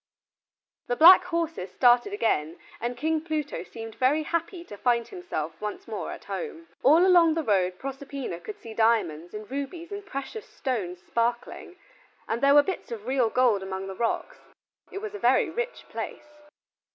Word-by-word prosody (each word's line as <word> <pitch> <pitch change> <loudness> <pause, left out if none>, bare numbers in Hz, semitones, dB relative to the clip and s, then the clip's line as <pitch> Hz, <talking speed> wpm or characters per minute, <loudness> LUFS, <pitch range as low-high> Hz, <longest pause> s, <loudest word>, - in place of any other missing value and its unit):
The 245 - 0
black 360 +5 +9
horses 335 - -2
started 245 - +4
again 165 - 0 0.2
and 240 +1 -3
King 315 +3 0
Pluto 310 -3 -3
seemed 225 -1 -9
very 280 +6 +2
happy 335 +2 -3
to 210 - -10
find 235 +2 +1
himself 350 - -5
once 210 - -5
more - - -4
at - - -9
home. 335 -8 -6
All 320 +7 +6
along 345 -4 +5
the 325 - -1
road 185 -6 +1
Proserpina 270 -7 -6
could 210 +5 -8
see 225 - -10
diamonds, 215 -7 +1
and 210 +1 -8
rubies 325 +6 -5
and 405 0 -5
precious 400 - -7
stones 185 -9 -4
sparkling, 235 +1 -2 0.5
and 230 +2 -2
there 280 +1 +5
were 290 - +8
bits 375 -4 -5
of 220 -2 -6
real 255 -2 +2
gold 235 -5 +3
among 190 0 -5
the 195 - -6
rocks. 235 - -2 0.5
It 395 - -6
was 430 -1 -5
a 415 - -6
very - - +3
rich 485 +1 -4
place. 300 - -7
260 Hz, 170 wpm, -27 LUFS, 220-330 Hz, 0.5 s, black